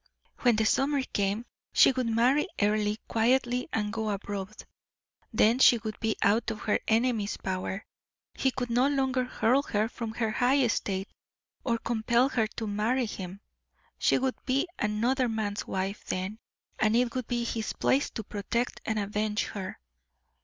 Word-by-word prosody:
When 245 -3 +4
the 220 0 +1
summer 275 +4 +2
came, 205 -1 -1 0.3
she - - +7
would 255 -2 -1
marry 245 - +3
Earle 210 0 +2
quietly 245 +3 +1
and 210 -1 -1
go 220 -1 -2
abroad. 200 0 -5 0.7
Then 225 +2 +4
she 245 - +7
would 215 -1 -6
be 220 -1 0
out 215 +4 +3
of 215 - -5
her 210 - +1
enemy's 225 -2 +1
power; 190 +2 -3 0.5
he 265 - +1
could 245 -2 -4
no 245 +3 +4
longer 265 -2 +1
hurl 250 +2 +2
her 215 -6 0
from 230 -1 -6
her 225 -2 0
high 250 +5 +3
estate, 195 -4 -1 0.6
or 235 -2 +1
compel 235 +3 +1
her 225 -5 +1
to 225 +1 -6
marry 220 +5 0
him. 195 -2 -7 0.6
She - - +3
would 260 0 -2
be 270 +6 +1
another 235 +5 +1
man's 215 -2 -2
wife 190 +2 -3
then, 190 +4 -3 0.4
and 215 +1 +3
it 240 0 +2
would 255 -3 -3
be 240 -1 -1
his 225 -2 -2
place 275 +2 +1
to 220 - -6
protect 215 +4 -2
and 220 - -1
avenge 210 +1 -1
her. 190 -2 -6
225 Hz, 160 wpm, -28 LUFS, 210-250 Hz, 0.7 s, she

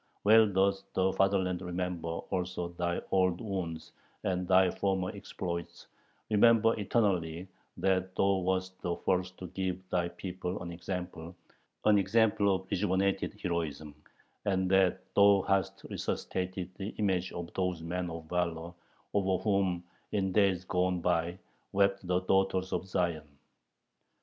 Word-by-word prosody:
Well 110 +1 +7
doth 95 0 +2
the 95 0 +2
fatherland 95 -2 +1
remember 90 -2 -3
also 90 +1 -3
thy 85 0 -2
old 95 -2 +3
wounds 90 -7 -4 0.3
and 90 -1 -1
thy 95 0 +5
former 95 -2 -1
exploits, 85 -3 -5 0.5
remember 115 +1 +5
eternally 95 -5 0 0.3
that 95 -1 0
thou 100 0 +3
wast 95 0 -2
the 85 -1 -1
first 90 +1 -1
to 90 - -7
give 95 0 -3
thy 85 -1 +1
people 90 +1 -5
an 85 - -6
example, 90 -1 -6 0.5
an 105 -1 +6
example 100 -1 +3
of 95 0 -5
rejuvenated 95 0 0
heroism, 80 -4 -3 0.5
and 95 -2 +1
that 95 -1 +4
thou 100 -1 +6
hast 95 0 0
resuscitated 90 -1 -3
the 100 +2 -5
image 95 -3 0
of 85 -1 -6
those 90 -3 -1
men 90 +1 -2
of 80 0 -6
valor 85 0 -2 0.4
over 95 -2 +1
whom 95 -4 +1 0.3
in 95 -2 +1
days 95 -2 +2
gone 90 0 +1
by 85 0 0 0.4
wept 100 -1 +2
the 90 0 +2
daughters 95 0 +1
of 95 - -2
Zion. 80 -6 -2
95 Hz, 135 wpm, -31 LUFS, 90-95 Hz, 0.5 s, Well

